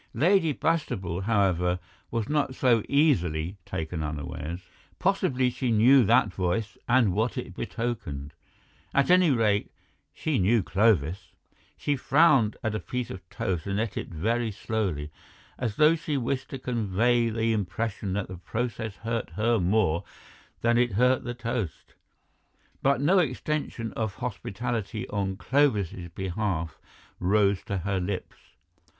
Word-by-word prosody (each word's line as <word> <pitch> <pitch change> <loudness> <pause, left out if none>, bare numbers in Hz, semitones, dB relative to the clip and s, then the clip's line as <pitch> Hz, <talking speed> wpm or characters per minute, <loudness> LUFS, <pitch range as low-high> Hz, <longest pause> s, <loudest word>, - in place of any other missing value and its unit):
Lady 170 0 +3
Bastable, 95 - -1
however, 90 -5 +2 0.3
was 115 -2 -2
not 145 -3 0
so 120 -4 +3
easily 90 - +2
taken 80 +1 -4
unawares; 75 +3 -5 0.4
possibly 125 -1 +1
she 125 0 -2
knew 120 +4 +6
that 115 -2 +3
voice 95 +4 -1
and 120 -6 +4
what 110 +5 0
it - - -5
betokened—at 115 - -4
any 180 -2 +6
rate, 110 -6 +2 0.4
she 155 -6 -1
knew 105 +3 +3
Clovis. 95 -4 +1 0.4
She 145 - 0
frowned 135 -5 +4
at 110 - -1
a 110 - -1
piece 125 +6 -4
of 90 -2 -9
toast 90 -3 -3
and 100 +1 -1
ate 110 -2 -2
it - - -3
very 115 +8 -1
slowly, 95 -9 -2 0.5
as 115 -5 -2
though 155 +4 +6
she 155 -3 -2
wished 130 +1 -2
to 135 - -5
convey 120 -1 +1
the 115 0 0
impression 105 0 -2
that 100 0 -2
the 95 - -8
process 110 +2 -3
hurt 115 +1 -3
her 115 +2 +2
more 90 -3 +2 0.6
than 120 0 +3
it 120 -3 +2
hurt 125 +5 +3
the 120 0 -4
toast; 115 - -4 0.9
but 140 -2 +3
no 180 +7 +4
extension 145 -5 -2
of 110 -3 -3
hospitality 110 -2 -4
on 95 -2 -2
Clovis's 105 - +1
behalf 95 -4 -2 0.4
rose 100 +1 +2
to 100 - -2
her 95 +1 -1
lips. 90 +1 -4
110 Hz, 135 wpm, -27 LUFS, 95-125 Hz, 0.9 s, knew